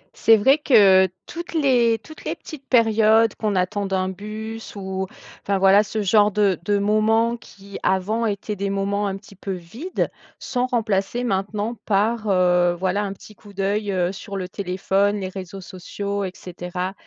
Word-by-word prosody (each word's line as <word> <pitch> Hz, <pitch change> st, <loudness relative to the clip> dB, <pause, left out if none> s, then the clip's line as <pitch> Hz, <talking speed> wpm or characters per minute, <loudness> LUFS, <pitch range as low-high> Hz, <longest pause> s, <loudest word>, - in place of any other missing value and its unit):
C'est 225 Hz, 0 st, +5 dB
vrai 270 Hz, +8 st, +4 dB
que, 195 Hz, -9 st, +6 dB, 0.2 s
toutes 340 Hz, +1 st, -7 dB
les 245 Hz, -7 st, +3 dB
toutes 310 Hz, +8 st, -14 dB
les -, -, -3 dB
petites 285 Hz, -4 st, -11 dB
périodes, 225 Hz, -2 st, +4 dB
qu'on 210 Hz, -2 st, -1 dB
attende 195 Hz, +1 st, -1 dB
un 185 Hz, 0 st, 0 dB
bus 215 Hz, +4 st, -7 dB
ou 190 Hz, -1 st, -4 dB, 0.4 s
enfin, 200 Hz, 0 st, 0 dB
voilà 195 Hz, +2 st, +6 dB
ce 215 Hz, 0 st, -3 dB
genre 205 Hz, +1 st, +4 dB
de 200 Hz, -3 st, +2 dB
de 205 Hz, +3 st, +1 dB
moments 220 Hz, +3 st, +2 dB
qui, 200 Hz, -3 st, -12 dB
avant 215 Hz, +5 st, 0 dB
étaient 205 Hz, 0 st, -3 dB
des 200 Hz, 0 st, -2 dB
moments 200 Hz, +1 st, -1 dB
un 195 Hz, 0 st, -3 dB
petit 200 Hz, -1 st, -16 dB
peu 195 Hz, +1 st, -5 dB
vides. 220 Hz, -, -4 dB, 0.3 s
Sont 250 Hz, 0 st, -2 dB
remplacés 220 Hz, -1 st, -1 dB
maintenant 205 Hz, +1 st, -2 dB
par, 215 Hz, +2 st, +1 dB
heu, 180 Hz, -2 st, +3 dB
voilà 190 Hz, +2 st, 0 dB
un 195 Hz, -1 st, -3 dB
petit 215 Hz, -, -15 dB
coup 205 Hz, -1 st, -16 dB
d'œil, 200 Hz, +1 st, -1 dB
heu, 180 Hz, -1 st, 0 dB
sur 200 Hz, 0 st, -7 dB
le 185 Hz, -, -4 dB
téléphone, 195 Hz, +2 st, 0 dB
les 190 Hz, -1 st, -4 dB
réseaux 190 Hz, 0 st, -8 dB
sociaux 200 Hz, +2 st, -5 dB
et 185 Hz, -, -3 dB
cetera. 180 Hz, +1 st, -5 dB
200 Hz, 170 wpm, -22 LUFS, 190-220 Hz, 0.4 s, que